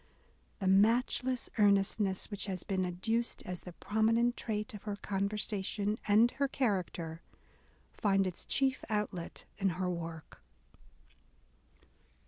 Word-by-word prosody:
The 195 - -4
matchless 240 +5 +3
earnestness" 200 -1 +2
which 205 0 -4
has 185 -2 -3
been 190 -2 0
adduced 225 +7 -1
as 180 -1 -4
the 180 - -9
prominent 225 +5 +2
trait 215 +2 -3
of 210 - -8
her 210 -2 -3
conversation 200 +1 -1
and 220 +4 +6
her 280 0 0
character, 180 -10 -1 0.7
finds 195 -3 +2
its 180 - -5
chief 265 -1 +1
outlet 210 -5 -3
in 195 -1 +3
her 180 -1 0
work. 165 -2 -7
205 Hz, 115 wpm, -33 LUFS, 185-225 Hz, 0.7 s, and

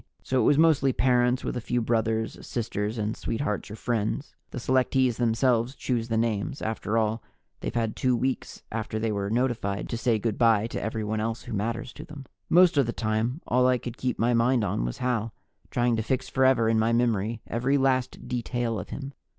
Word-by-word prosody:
So 130 -1 +1
it - - +2
was 145 - +4
mostly 150 -5 +4
parents, 125 0 +2
with - - -3
a 125 - -2
few 120 +2 -1
brothers, 110 -1 0
sisters 110 -1 -3
and 110 0 -1
sweethearts 110 -3 -3
or 105 - -6
friends. 115 +4 -2 0.2
The - - -8
selectees 130 -1 +2
themselves 120 +1 +1
choose 120 -3 -2
the 115 -1 0
names. 115 +2 -1
After 110 0 -2
all, 110 0 +1 0.4
they've - - -5
had 115 -2 0
two 125 -1 +2
weeks 130 +2 -3
after 110 0 -3
they 110 0 0
were 100 -1 -2
notified 115 -4 -1
to 115 - -2
say 115 -1 +2
good 110 0 -2
by 115 -3 +4
to 115 - -4
everyone 110 0 -2
else 115 +1 -2
who 120 - -7
matters 115 +3 -3
to - - -9
them. 145 -3 -10 0.2
Most 180 -2 +5
of 135 -4 +4
the 120 - -2
time, 115 +6 -1
all 125 +1 +3
I 130 0 +3
could 120 -1 -7
keep 130 -1 -2
my 120 +2 +2
mind 120 0 +3
on - - -1
was - - -4
Hal, 115 -3 -1 0.3
trying 120 -1 +1
to - - 0
fix 130 +3 -1
forever 130 -3 +3
in 110 0 +3
my 110 +1 +2
memory 115 -2 0
every 125 +5 +1
last 130 -2 0
detail 120 -2 -2
of 90 - -7
him. 140 0 -6
115 Hz, 205 wpm, -27 LUFS, 110-125 Hz, 0.4 s, Most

